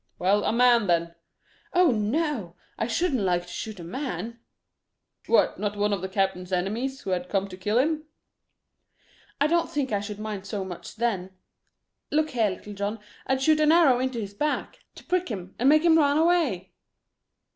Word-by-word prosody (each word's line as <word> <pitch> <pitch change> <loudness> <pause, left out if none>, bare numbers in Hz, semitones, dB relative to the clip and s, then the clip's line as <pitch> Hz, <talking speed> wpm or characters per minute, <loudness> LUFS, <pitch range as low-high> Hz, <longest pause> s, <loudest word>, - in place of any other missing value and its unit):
"Well, 200 +3 +2
a - - +2
man 240 -2 +4
then." 170 -1 +1 0.6
"Oh, 360 -4 +5
no! 225 - -1 0.2
I - - -2
shouldn't 265 0 0
like 175 -2 +1
to - - -17
shoot 215 -3 -6
a - - -7
man." 235 - -5 0.9
"What - - +3
not 205 -1 -2
one 205 0 +1
of 195 - -2
the 190 - -4
captain's 190 -1 -1
enemies 220 +9 -2
who 190 - -4
had 180 0 -2
come 195 -1 0
to 185 - -8
kill 210 +4 -1
him?" 305 +4 +1 1.3
"I 285 - +3
don't 335 +2 +2
think 280 -4 -2
I 205 - +1
should 205 0 -6
mind 210 -2 -5
so 195 -1 -3
much 180 -2 -8
then. 190 -5 -2 0.7
Look 310 +1 +1
here, 225 -4 +2
Little 205 +2 -7
John, 205 +2 -3 0.3
I'd 265 0 +1
shoot 310 +1 +4
an 305 0 +4
arrow 315 -7 +5
into 255 -2 -2
his 200 -2 -5
back, 295 +8 -2 0.2
to - - -12
prick 365 -2 -1
him 190 -4 -6
and 255 +3 +4
make 310 +2 +5
him 325 -1 +5
run 285 -1 +3
away." 315 - +1
220 Hz, 185 wpm, -26 LUFS, 195-285 Hz, 1.3 s, Oh